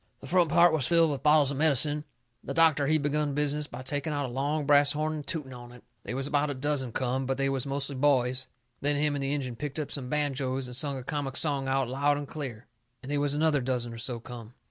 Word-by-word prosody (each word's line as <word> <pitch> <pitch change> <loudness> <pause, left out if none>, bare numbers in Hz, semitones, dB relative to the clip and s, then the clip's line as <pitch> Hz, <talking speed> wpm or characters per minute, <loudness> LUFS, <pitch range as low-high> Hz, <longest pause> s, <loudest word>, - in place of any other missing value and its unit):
The - - -12
front 175 +3 +2
part 170 0 +5
was 145 -5 +1
filled 165 -2 +4
with 140 - -4
bottles 150 -2 +5
of 140 - -4
medicine. 150 0 +4 0.4
The - - -5
doctor, 160 -3 +4
he 155 +2 +4
begun 145 -1 -1
business 150 0 0
by 130 - -8
taking 145 +3 -2
out 145 -1 -1
a 120 - -6
long 145 +3 -1
brass 145 0 +5
horn 155 +1 -1
and 150 -2 -6
tooting 145 -5 -3
on 120 -1 -11
it. 125 0 -15 0.2
They 115 - -5
was 135 0 -1
about 145 +1 +1
a 145 - -3
dozen 135 -2 -2
come, 130 +2 -2
but 135 0 -1
they 135 0 0
was 135 -1 -2
mostly 140 +1 -3
boys. 130 -2 +2 0.3
Then 145 +1 0
him 150 0 +1
and 140 - -3
the 135 0 -2
Injun 130 -4 -3
picked 150 +1 -5
up 150 -2 -4
some 130 -3 -5
banjoes 135 -3 -1
and 125 0 -6
sung 140 +1 -1
a 130 - -7
comic 135 -1 -2
song 140 -3 0
out 135 -1 +1
loud 145 +3 +1
and 145 -1 -5
clear. 130 -7 -6 0.4
And 135 - -7
they 145 - 0
was 145 0 0
another 150 -2 +2
dozen 120 -2 -2
or 115 - -8
so 120 +1 -3
come. 120 0 -10
140 Hz, 255 wpm, -28 LUFS, 130-150 Hz, 0.4 s, part